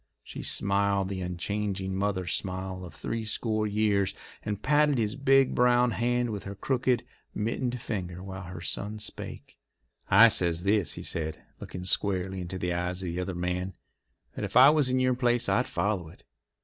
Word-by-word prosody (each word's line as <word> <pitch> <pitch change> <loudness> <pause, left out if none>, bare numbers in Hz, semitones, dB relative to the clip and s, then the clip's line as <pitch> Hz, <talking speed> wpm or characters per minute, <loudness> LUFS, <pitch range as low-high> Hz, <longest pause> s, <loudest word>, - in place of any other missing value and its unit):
She - - -8
smiled 100 -1 +1
the 95 -1 -4
unchanging 95 +2 -2
mother 95 -1 -1
smile 95 +1 -3
of 85 -3 -10
three 115 0 -3
score 110 0 0
years, 105 -2 +1 0.3
and 105 -1 -3
patted 150 +2 +3
his 110 -1 0
big 135 -1 +4
brown 125 0 +4
hand 120 +3 0
with 100 -2 -5
her 100 0 -6
crooked, 125 +2 0 0.3
mittened 120 +3 -2
fingers 90 -6 -4
while 95 -1 -7
her 90 -1 -8
son 105 +4 -3
spake. 105 - -7 0.5
"I 110 +4 +9
says 85 -4 +2
this," 100 -3 +2
he - - -7
said, 80 -1 -3 0.2
looking 90 - -7
squarely 95 0 0
into 90 +1 -5
the 90 -1 -1
eyes 90 +2 -2
of 90 - -3
the 90 - -3
other 90 0 -4
man, 90 +2 -2 0.6
"that - - -5
if - - 0
I 135 +3 +9
was 150 -4 +3
in 130 0 +2
your 130 0 +3
place 120 -1 +1
I'd 125 - +2
follow 100 -6 -1
it. - - -17
100 Hz, 175 wpm, -28 LUFS, 90-120 Hz, 0.6 s, I